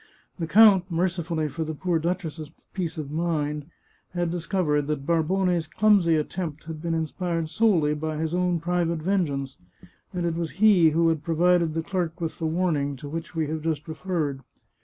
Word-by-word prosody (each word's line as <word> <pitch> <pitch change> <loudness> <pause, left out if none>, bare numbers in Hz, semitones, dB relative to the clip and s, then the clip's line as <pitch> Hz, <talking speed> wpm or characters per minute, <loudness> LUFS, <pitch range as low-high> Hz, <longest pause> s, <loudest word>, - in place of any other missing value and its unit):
The 165 - -2
count, 200 -1 +6
merci 175 +1 0
fully 160 -2 -2
for 160 +3 -4
the 160 0 -4
poor 175 +1 0
duchess's 165 -2 -3 0.2
peace 170 -5 -3
of 145 -2 -5
mind, 150 -2 -1 0.5
had 175 -1 0
discovered 165 -4 0
that 150 -2 -2
Barbone's 170 +1 +1
clumsy 195 -4 +4
attempt 155 0 -3
had 160 -1 -7
been 165 0 -1
inspired 165 +1 -2
solely 170 -7 +3
by 155 +1 -3
his 160 +1 -2
own 180 -1 +1
private 170 0 0
vengeance, 145 -8 -1 0.5
and 180 -3 -2
it 170 - 0
was 165 -1 -3
he 195 -4 +5
who 165 +2 +3
had 160 -2 0
provided 170 0 +2
the 165 - -1
clerk 175 -1 -2
with 165 -2 -4
the 165 - -1
warning 155 -4 0
to 140 +2 -9
which 165 +3 -6
we 160 -1 +1
have 160 0 -3
just 155 -2 -2
referred. 160 -4 -2
165 Hz, 180 wpm, -25 LUFS, 155-180 Hz, 0.5 s, count